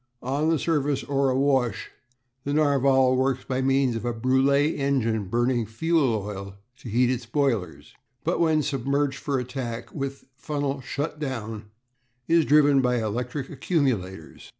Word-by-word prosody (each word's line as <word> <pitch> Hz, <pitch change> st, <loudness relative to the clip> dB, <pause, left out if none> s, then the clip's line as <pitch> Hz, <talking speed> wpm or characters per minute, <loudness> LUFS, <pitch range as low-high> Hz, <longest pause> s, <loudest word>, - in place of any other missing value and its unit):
On 140 Hz, +5 st, 0 dB
the 165 Hz, -, +3 dB
surface 145 Hz, -3 st, 0 dB
or 140 Hz, -1 st, +1 dB
awash 130 Hz, -4 st, +1 dB, 0.5 s
the 140 Hz, -, -2 dB
Narval 135 Hz, -3 st, +3 dB
works 130 Hz, 0 st, 0 dB
by 130 Hz, 0 st, -2 dB
means 135 Hz, -2 st, +2 dB
of 115 Hz, -, -4 dB
a 120 Hz, -1 st, -2 dB
Brulé 135 Hz, +5 st, +2 dB
engine 115 Hz, -7 st, 0 dB
burning 120 Hz, +5 st, +1 dB
oil 115 Hz, -, -2 dB
fuel 110 Hz, -, -1 dB, 0.2 s
to 120 Hz, -, -10 dB
heat 120 Hz, +3 st, +2 dB
its 125 Hz, -2 st, -4 dB
boilers; 110 Hz, -, -1 dB, 0.3 s
but -, -, 0 dB
when 160 Hz, -2 st, +3 dB
submerged 140 Hz, 0 st, -1 dB
for 140 Hz, -1 st, -1 dB
attack 120 Hz, -2 st, -5 dB
with 140 Hz, -2 st, -5 dB
funnel 145 Hz, -1 st, -3 dB
shut 145 Hz, +4 st, -4 dB
down 115 Hz, -7 st, -5 dB, 0.6 s
is 165 Hz, -1 st, +4 dB
driven 145 Hz, -2 st, +5 dB
by 125 Hz, -1 st, +1 dB
electric 125 Hz, +5 st, -3 dB
accumulators. 125 Hz, -, -2 dB
130 Hz, 145 wpm, -25 LUFS, 120-140 Hz, 0.6 s, driven